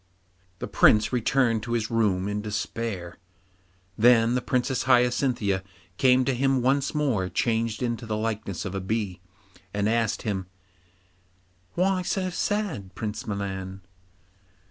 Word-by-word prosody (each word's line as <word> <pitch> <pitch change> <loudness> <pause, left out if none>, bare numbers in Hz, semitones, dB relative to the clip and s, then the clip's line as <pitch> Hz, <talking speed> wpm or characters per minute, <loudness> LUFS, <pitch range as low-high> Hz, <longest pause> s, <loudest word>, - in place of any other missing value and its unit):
The - - -5
Prince 110 +1 +4
returned 120 -1 +2
to 120 +2 -4
his 115 -2 -1
room 100 -5 +1
in 105 0 -2
despair; 105 -3 -4 0.8
then 115 +1 +5
the 125 - +1
Princess 125 +1 0
Hyacinthia 125 -5 +2 0.4
came 130 -1 +4
to 135 - +1
him 135 0 +1
once 140 +3 +1
more 125 -11 0
changed 115 +1 0
into 120 -1 -2
the 110 -1 -1
likeness 110 -4 -3
of 95 - -4
a 95 - -3
bee, 95 -3 -2 0.5
and 100 0 +1
asked 115 -1 0
him, 95 -4 -2 1.3
'Why 185 +1 +2
so 185 +1 -1
sad, 180 - -2
Prince 105 -1 -5
Milan? 95 -2 -4
115 Hz, 130 wpm, -26 LUFS, 100-125 Hz, 1.3 s, then